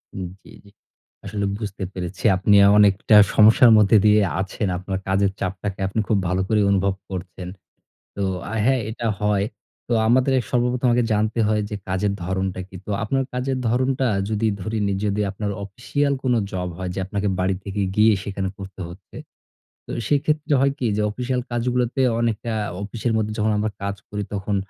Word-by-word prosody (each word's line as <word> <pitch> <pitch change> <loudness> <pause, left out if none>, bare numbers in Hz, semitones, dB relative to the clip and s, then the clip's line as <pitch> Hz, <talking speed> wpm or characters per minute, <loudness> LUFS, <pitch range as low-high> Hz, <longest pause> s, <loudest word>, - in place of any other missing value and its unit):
উম 95 - -4 0.2
জি, - - -15
জি। 100 - -18 0.5
আসলে 100 0 -2
বুঝতে 105 -3 -5
পেরেছি। 90 +1 -6
আপনি 100 +2 +3 0.2
অনেকটা 105 +1 +4 0.2
সমস্যার 110 +3 +7
মধ্যে 105 +1 +5
দিয়ে 105 0 +5 0.2
আছেন। 100 +3 -3
আপনার 95 +1 -4
কাজের 95 +1 +2
চাপটাকে 95 +1 -4
আপনি 100 +3 -2
খুব 110 - +2
ভালো 90 +2 0
করে 110 +1 +2
অনুভব 100 0 +2 0.2
করছেন। 90 -1 -6 0.7
তো 100 - -2 0.3
আ - - -4
হ্যাঁ, 130 -1 +3
এটা 115 +1 -3
হয়। 105 -1 +1 0.4
তো 120 - 0
আমাদের 130 +3 +3 0.2
সর্বপ্রথম 125 +1 +1
আগে 120 0 +2
জানতে 110 +2 0
হয় 105 0 +1
যে 105 - -4
কাজের 95 +2 0
ধরণটা 95 +1 -2
কী। 95 - -14
তো - - -4
আপনার 135 +5 0
কাজের 130 +1 -1
ধরণটা 130 +2 +1 0.2
যদি 110 +1 0
ধরে 110 +3 -3
নিই 100 -1 -1
যদি 105 0 0
আপনার 100 +1 -3
অফিশিয়াল 140 +7 -1
কোন 130 -2 +2 0.2
জব 90 -1 -3
হয় 95 -1 -4
যে - - -3
আপনাকে 100 +1 -2
বাড়ি 95 +1 +1
থেকে 100 0 -3
গিয়ে 110 +1 +5
সেখানে 100 -2 -3
করতে 95 0 -9
হচ্ছে। 85 +2 -14 0.7
তো - - -8 0.2
সেক্ষেত্রে 150 +1 +1
হয় 140 0 +3
কি? 130 - -3
যে - - +1
অফিসিয়াল 125 +3 -2
কাজগুলোতে 125 +2 0 0.2
অনেকটা 115 0 -1 0.3
অফিসের 115 +3 -3
মধ্যে 110 -1 -1
যখন 110 +1 +2
আমরা 105 +1 -1
কাজ 100 0 -2
করি 105 0 -3
তখন 100 0 -2
105 Hz, 175 wpm, -22 LUFS, 95-120 Hz, 0.7 s, সমস্যার